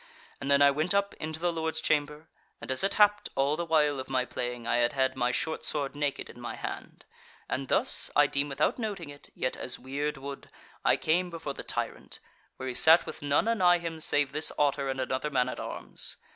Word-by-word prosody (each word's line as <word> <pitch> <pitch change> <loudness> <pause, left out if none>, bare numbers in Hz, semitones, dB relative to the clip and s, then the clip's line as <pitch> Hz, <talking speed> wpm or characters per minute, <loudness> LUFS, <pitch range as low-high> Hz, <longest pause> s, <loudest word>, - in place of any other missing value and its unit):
And 140 - -4
then 140 0 +5
I 140 - +7
went 155 +7 +1
up 200 0 +1
into 155 0 -4
the 175 0 0
Lord's 160 -1 -1
chamber; 150 0 -1 0.3
and - - -5
as 130 - +2
it 195 - +1
happed, 210 -1 +4
all 140 +2 +2
the 170 +1 -4
while 150 -3 +2
of 130 - -6
my 130 -1 +1
playing 125 -2 -4
I 120 - +1
had 120 0 +2
had 130 -1 +1
my 125 -1 +1
short 160 +5 -2
sword 145 -2 -1
naked 145 -1 -2
in - - -12
my - - -5
hand, - - -7 0.4
and 135 0 -3
thus, - - +2
I 145 - +6
deem 140 +1 -1
without 140 - 0
noting 195 -9 -4
it, 145 - -14
yet 130 - -2
as 125 - -4
weird 145 +2 -3
would, 140 0 -8 0.3
I - - +4
came 175 +3 +1
before 160 -4 -5
the - - -7
tyrant, - - -5 0.4
where 130 - -5
he 130 - -3
sat 160 +6 +7
with - - -8
none 145 +8 +1
anigh 185 -6 +4
him 165 -2 -5
save 145 -2 +1
this 150 +2 +2
Otter 140 -1 +1
and 135 0 -3
another 130 +3 -2
man 125 -3 +1
at - - -6
arms. - - -5
145 Hz, 220 wpm, -29 LUFS, 135-160 Hz, 0.4 s, I